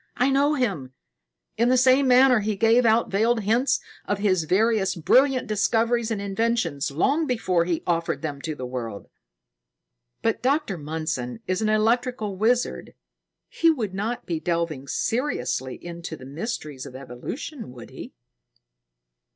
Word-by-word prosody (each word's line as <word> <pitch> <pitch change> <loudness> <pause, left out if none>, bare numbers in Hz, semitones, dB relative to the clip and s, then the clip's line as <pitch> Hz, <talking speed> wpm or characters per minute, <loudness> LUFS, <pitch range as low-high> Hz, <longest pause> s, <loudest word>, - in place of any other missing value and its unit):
I 255 +2 +3
know 285 +2 +3
him. 185 - -2 0.6
In 235 +2 +3
the 255 - +4
same 260 +2 +4
manner 250 -1 +6
he 210 0 -1
gave 230 +4 +4
out 225 +1 +3
veiled 225 +4 +2
hints 230 +6 +2 0.3
of 205 - -1
his 185 -5 +1
various 195 +2 +2
brilliant 255 - +3
discoveries 230 +2 +1
and 220 -3 -2
inventions 200 -7 -1
long 275 - +1
before 185 -9 +1
he 170 -2 -2
offered 165 -1 -1
them 145 -3 -4
to 155 0 -4
the 130 - -6
world." 120 -5 -6 1.1
"But 225 - 0
Dr. 260 - 0
Mundson 150 -6 -4
is 185 +2 -1
an 215 - +1
electrical 220 -1 +1
wizard. 235 +5 0 0.5
He 330 - +2
would 230 -11 -1
not 215 +5 -3
be 165 -2 -2
delving 165 -5 -2
seriously 225 - -2
into 170 -1 -8
the 130 - -12
mysteries 150 - -5
of 130 - -11
evolution, 140 - -7
would 120 -2 -12
he?" - - -9
210 Hz, 145 wpm, -24 LUFS, 160-240 Hz, 1.1 s, manner